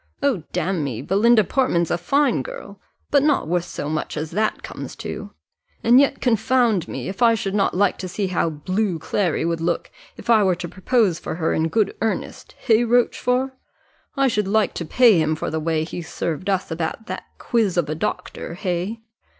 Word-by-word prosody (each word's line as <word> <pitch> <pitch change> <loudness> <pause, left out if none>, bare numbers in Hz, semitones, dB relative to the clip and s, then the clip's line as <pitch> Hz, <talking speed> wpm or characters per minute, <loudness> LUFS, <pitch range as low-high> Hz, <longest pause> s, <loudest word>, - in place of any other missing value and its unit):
Oh, 270 -11 +2
damme, 145 - -2
Belinda 215 +3 +4
Portman's 175 - +1
a - - +2
fine 280 - +2
girl, - - -9 0.3
but 285 - +5
not 290 - +2
worth 175 +1 0
so - - -5
much 155 0 -3
as 155 +1 -4
that 215 +5 -1
comes - - -7
to; - - -6 0.5
and 240 +3 +6
yet, 280 0 +2
confound 235 -4 +2
me, - - -5
if 195 +3 -6
I 230 -1 +6
should 195 -3 -3
not 200 -3 +1
like 200 -1 +2
to 185 - -4
see 195 +3 -2
how 180 -2 0
blue 185 +5 -1
Clary 170 +1 -1
would 165 -1 -1
look, 170 0 -1 0.3
if - - -11
I 230 -2 +5
were 185 -2 +3
to 175 0 -6
propose 190 -1 +1
for - - -5
her 160 -1 0
in 160 +1 +1
good 205 +4 0
earnest 225 - -3
hey, 230 -1 +3
Rochfort? 250 +2 +1 0.7
I 275 0 +4
should 210 -5 0
like 215 +1 +2
to 170 - -4
pay 225 +2 +5
him 155 0 +1
for - - -4
the 160 - -1
way 160 0 0
he 175 +2 -6
served 170 +2 -4
us 190 -3 -1
about 160 +6 -3
that - - -6
quiz 220 -7 0
of 175 - +2
a 155 - -2
doctor, 165 +1 -4
hey?" 185 +5 -3
195 Hz, 195 wpm, -22 LUFS, 170-230 Hz, 0.7 s, and